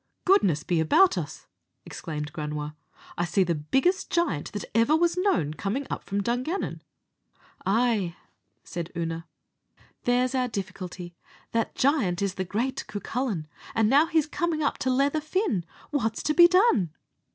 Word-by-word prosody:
"Goodness 195 - +4
be 175 -2 +1
about 355 - +5
us!" 150 -5 -5 0.4
exclaimed 150 -2 -6
Granua, 150 0 -4 0.4
"I 175 - +2
see 190 +2 +2
the 175 -2 0
biggest 270 - +1
giant 200 - 0
that 205 - -4
ever 230 +7 +4
was 345 +1 +2
known 360 - +1
coming 205 - -2
up - - -3
from 200 +1 -2
Dungannon." 255 - -2 0.9
"Ay," 210 -5 +2 0.5
said 170 0 -5
Oonagh, 165 0 -3 0.8
"there's 250 +1 +2
our 255 -1 +1
difficulty. 185 -4 -6 0.4
That 230 -1 -1
giant 220 - +2
is 195 -2 0
the 190 - -2
great 230 +8 -2
Cucullin; 215 -4 -3 0.3
and 225 +2 +3 0.2
he's 320 -3 +3
now - - -20
commin' 335 -3 0
up 285 - 0
to 260 - 0
leather 275 +4 +2
Fin. 310 - 0 0.3
What's 225 -7 -1
to 305 - +1
be 345 +2 +9
done?" 355 - +3
220 Hz, 150 wpm, -27 LUFS, 175-285 Hz, 0.9 s, be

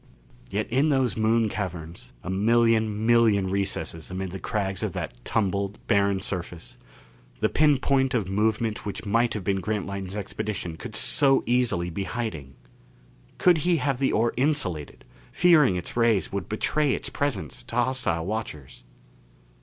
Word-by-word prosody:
Yet 105 +2 -2
in 135 +5 +3
those 135 -4 +1
Moon 110 +1 +2
caverns 90 -5 -6
a - - -6
million 110 +1 +2
million 110 -5 +4
recesses 95 -5 -3
amid 95 0 -4
the 95 - -6
crags 95 -2 -2
of - - -2
that - - -4
tumbled, 100 0 -1
barren 100 -3 +2
surface 90 -3 -5 0.6
the 110 - +2
pin 150 -2 +4
point 135 -1 +1
of 105 -6 0
movement 110 +2 0
which 105 0 -5
might 115 +3 +1
have 105 - -4
been 95 +1 0
Grantline's 100 -1 -4
expedition 100 -3 -4
could 105 - -8
so 135 +4 +4
easily 120 -8 +1
be 95 +4 -3
hiding! 80 - -5 0.8
Could 175 -3 +4
he 175 +2 +2
have 140 -4 -1
the 135 - +2
ore 115 +1 +1
insulated, 125 - -1 0.3
fearing 155 - +5
its 90 - -5
rays 115 -4 +2
would 100 -2 -4
betray 145 +6 +1
its - - -5
presence 140 -9 -3
to - - -9
hostile 120 -9 0
watchers? 95 -10 -5
105 Hz, 150 wpm, -25 LUFS, 95-120 Hz, 0.8 s, fearing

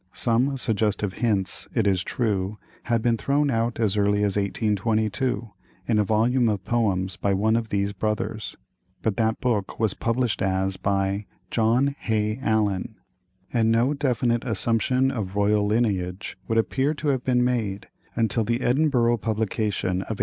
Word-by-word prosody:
Some 125 +4 +2
suggestive 105 -5 +1
hints, 105 -5 -1
it 115 -4 +2
is 95 -3 +2
true, 105 -2 -1 0.3
had 115 -2 0
been 120 -1 +2
thrown 140 +3 +1
out 115 0 -1
as 105 -3 +1
early 105 0 +2
as 100 -2 0
1822, 110 +3 0 0.4
in 110 -3 +2
a - - +4
volume 115 +3 +2
of 100 -3 -2
poems 95 -6 0
by 100 -1 +1
one 110 +3 +2
of 115 -1 -1
these 100 0 -1
brothers; 105 +1 -3 0.5
but 110 -3 0
that 110 -1 +1
book 110 -6 -1
was 110 -4 +2
published 120 0 -1
as 95 0 0
by 100 +1 -1 0.2
"John 120 +5 +2
Hay 110 +1 -1
Allen," 110 -3 0 0.6
and 115 -2 +3
no 120 +5 +3
definite 125 -5 0
assumption 120 +4 +1
of 105 -7 -4
royal 105 0 +2
lineage 100 -4 -1
would 115 - 0
appear 135 +6 +1
to 150 0 -2
have 130 -3 0
been 125 -1 +2
made 110 -6 -1 0.3
until 115 0 +1
the 115 +3 -1
Edinburgh 125 -3 +2
publication 105 -4 -1
of 110 +2 -5
1847. - - -17
110 Hz, 155 wpm, -24 LUFS, 100-120 Hz, 0.6 s, a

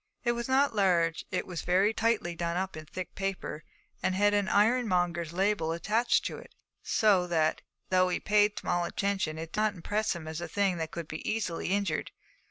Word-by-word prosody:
It 240 - +2
was 235 0 -3
not 270 -1 +3
large; 170 -5 +2
it 185 - -2
was 175 -3 -5
very 190 +5 +3
tightly 225 -7 0
done 170 0 -2
up 190 -1 -2
in 155 -1 -9
thick 185 +3 -6
paper, 195 -5 -4 0.4
and 185 - 0
had 205 +1 +3
an 205 -2 +1
ironmonger's 185 -7 +2
label 185 -3 +1
attached; 215 +8 +1 0.5
so 200 -5 +3
that, 160 -2 +1 0.3
though 185 0 +4
he 180 - -1
paid 210 0 +3
small 175 0 0
attention, 190 -4 -1
it 165 0 -7
did - - -2
not 215 -1 +1
impress 205 +3 -1
him 160 -2 -8
as 160 +1 -5
a 175 - -4
thing 195 -3 +1
that 160 -1 -3
could 170 -1 -6
be 155 - -5
easily 210 -6 -2
injured. 195 -4 0
185 Hz, 185 wpm, -29 LUFS, 170-210 Hz, 0.5 s, though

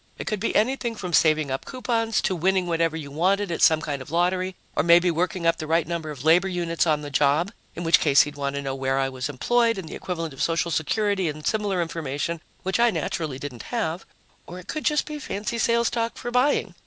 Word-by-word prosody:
It - - -6
could 215 -3 -2
be 225 - -2
anything 240 +1 +1
from 180 -5 -6
saving 155 -4 +3
up 135 - -3
coupons 230 -4 -1
to 190 - +1
winning 185 +2 +1
whatever 165 -1 0
you 145 -3 -7
wanted 190 +5 +1
at 165 - -3
some 160 -1 +5
kind 145 -3 -4
of 130 - -10
lottery, 180 +3 0 0.2
or - - +3
maybe 170 +2 +5
working 175 +2 -1
up 165 0 +3
the 155 - -6
right 165 0 +1
number 165 -2 -3
of 140 -4 -7
labor 175 +4 +5
units 175 -2 -1
on 150 -2 +2
the 145 -1 -7
job 150 +6 +2 0.2
in 175 - -5
which 165 +3 +5
case 140 -2 +5
he'd 145 0 -7
want 140 -1 -3
to 140 - -3
know 135 -1 -3
where 135 0 -1
I 135 0 +1
was 130 +1 -4
employed 230 - +1
and 185 -4 -6
the - - -8
equivalent 165 -4 -4
of 135 - -8
social 170 +1 0
security 195 +2 0
and 150 0 -7
similar 205 -5 0
information, 160 0 -4 0.2
which 190 +4 -1
I 240 0 +5
naturally 160 - -3
didn't 135 -3 -8
have 190 -8 -2 0.4
or 175 - -8
it 180 - -11
could 310 - -4
just 300 -1 +2
be 300 -1 -6
fancy 215 -2 -4
sales 235 +1 +2
talk 230 -1 -2
for 240 - -5
buying. 250 -6 +2
170 Hz, 235 wpm, -24 LUFS, 155-205 Hz, 0.4 s, some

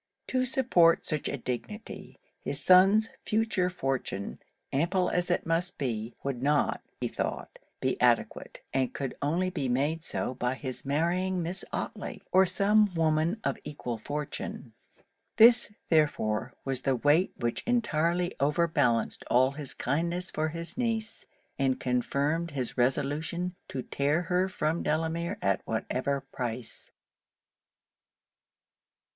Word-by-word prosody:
To 255 0 +1
support 210 -10 +4
such 155 -2 0
a 140 - -3
dignity, 130 - -6 0.2
his - - 0
son's 195 +4 +6
future 215 -4 +1
fortune, 135 - -3 0.3
ample 180 +6 +1
as 175 0 0
it - - +1
must 170 +2 +1
be, 115 -3 -3
would 135 -3 -3
not, 145 +2 +1 0.2
he - - 0
thought, - - -4 0.2
be - - -1
adequate; - - +1
and 130 -1 0
could 135 -2 -3
only 175 +6 0
be 140 -8 -2
made 145 +6 0
so 130 - -2
by 125 0 -1
his 130 -1 -4
marrying 175 +6 0
Miss 180 +3 -2
Otley - - -5
or 190 0 +5
some 205 +2 +3
woman 160 +5 +1
of 140 - -1
equal 125 -6 -5
fortune. 145 +6 -5 0.6
This, 230 0 +7 0.2
therefore, 145 -9 +1
was 135 -2 -1
the 135 - +1
weight 145 +8 +3
which 120 -1 -1
entirely 175 -7 +1
over 150 +5 +2
balanced 125 -8 +1
all 130 +2 +4
his 140 -1 -6
kindness 170 +6 -1
for 155 +1 0
his 170 +8 -4
niece, 225 -2 -2 0.3
and 135 -1 +1
confirmed 140 +6 0
his 130 -5 -3
resolution 145 +7 0
to 130 -2 -4
tear 145 +5 0
her 180 +2 +1
from 160 -2 -1
Delamere 165 +2 -1
at 100 -1 +2
whatever 130 +5 -1
price. 125 -3 -6
155 Hz, 130 wpm, -29 LUFS, 135-180 Hz, 0.6 s, This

